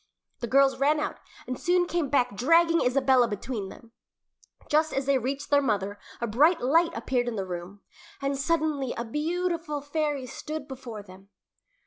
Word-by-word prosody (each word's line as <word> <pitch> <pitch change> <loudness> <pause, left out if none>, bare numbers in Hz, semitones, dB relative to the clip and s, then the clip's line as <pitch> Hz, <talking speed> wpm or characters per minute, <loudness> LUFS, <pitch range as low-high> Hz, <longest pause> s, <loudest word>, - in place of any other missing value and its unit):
The 235 - -3
girls 275 +3 +4
ran 295 +2 +3
out, - - -3 0.3
and 255 - -5
soon 355 +2 +2
came 345 -5 -1
back 250 -5 +1
dragging 330 - +4
Isabella 260 -1 +3
between 210 -1 -4
them. 230 +3 -14 0.8
Just 310 +1 +2
as 270 0 -1
they 275 -1 +3
reached 275 +4 -4
their 285 0 +5
mother 205 -5 -1 0.2
a 235 - -1
bright 290 +10 +4
light 325 +7 +3
appeared 245 +1 -1
in 240 - -2
the 195 -2 -2
room, 180 +2 -7 0.4
and 275 0 -1
suddenly 295 -2 0
a 235 - -3
beautiful 330 +3 -2
fairy 290 -2 -2
stood 305 +4 -6
before 250 -6 -8
them. 190 0 -15
270 Hz, 165 wpm, -27 LUFS, 235-305 Hz, 0.8 s, their